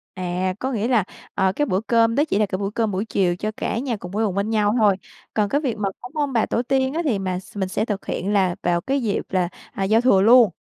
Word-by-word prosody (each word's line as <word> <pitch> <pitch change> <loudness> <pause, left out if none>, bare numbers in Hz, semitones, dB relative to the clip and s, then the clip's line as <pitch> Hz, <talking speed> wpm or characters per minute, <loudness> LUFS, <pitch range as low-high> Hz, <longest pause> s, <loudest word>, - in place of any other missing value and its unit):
À, 185 0 -2
có 265 +1 -2
nghĩa 225 0 -1
là, 235 -6 +3 0.3
ờ, 190 -1 +2
cái 295 +8 0
bữa 185 -5 0
cơm 230 +1 +2
đó 290 +4 +3
chỉ 200 - +1
là 210 - +3
cái 185 0 -3
bữa 200 0 -2
cơm 225 -1 0
buổi 195 +1 -1
chiều 185 -5 0
cho 215 +3 -2
cả - - -2
nhà 245 -3 -2
cùng 180 -1 -9
quây 220 +2 0
quần 190 - -2
bên 200 +2 -1
nhau 210 -1 +2
thôi. 205 -4 +4 0.4
Còn 210 -2 +2
cái 285 +5 +1
việc 255 -8 -2
mà 200 -2 0
cúng 245 +3 -10
ông 290 -3 0
bà 225 -2 +2
tổ 235 - 0
tiên 265 +1 0
á 330 - 0
thì 245 -10 +1
mà 185 -2 -2
x 190 - -17
mình 190 -2 -1
sẽ 190 - -1
thực 205 -3 -4
hiện 200 +3 -2
là 190 -3 +2
vào 175 -1 +1
cái 270 +7 -1
dịp 215 -4 0
là, 180 -2 +1 0.2
à, 195 - -2
giao 220 +3 +4
thừa 235 -6 +4
luôn? 235 -1 +7
210 Hz, 290 wpm, -22 LUFS, 190-240 Hz, 0.4 s, luôn